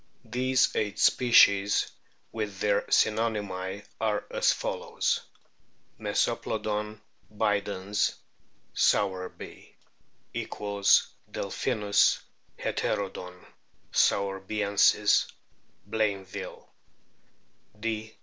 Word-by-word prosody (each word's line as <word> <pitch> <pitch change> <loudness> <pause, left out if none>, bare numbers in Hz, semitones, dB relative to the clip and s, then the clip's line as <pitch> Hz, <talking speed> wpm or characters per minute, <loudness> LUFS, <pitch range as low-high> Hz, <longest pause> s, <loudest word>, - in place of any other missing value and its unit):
These 130 +3 +1
eight 105 -2 -1
species, 105 -5 +4 0.4
with 105 -3 -4
their 100 0 +2
synonymy,* 105 -3 0 0.2
are 110 -2 0
as - - +3
follows: - - -1 0.8
Mesoplodon 105 0 -1 0.3
bidens, 105 -1 0 0.6
Sowerby 95 -2 -1 0.3
;] - - -41
(j= - - -3
DelpJiimis 100 0 +1 0.4
{Heter 100 -2 -2
don} 90 0 -10 0.5
soiverbiensis, 100 +1 +2 0.6
Blainville; 100 -3 -3 1.1
D. 110 0 -4
105 Hz, 65 wpm, -28 LUFS, 100-110 Hz, 1.1 s, species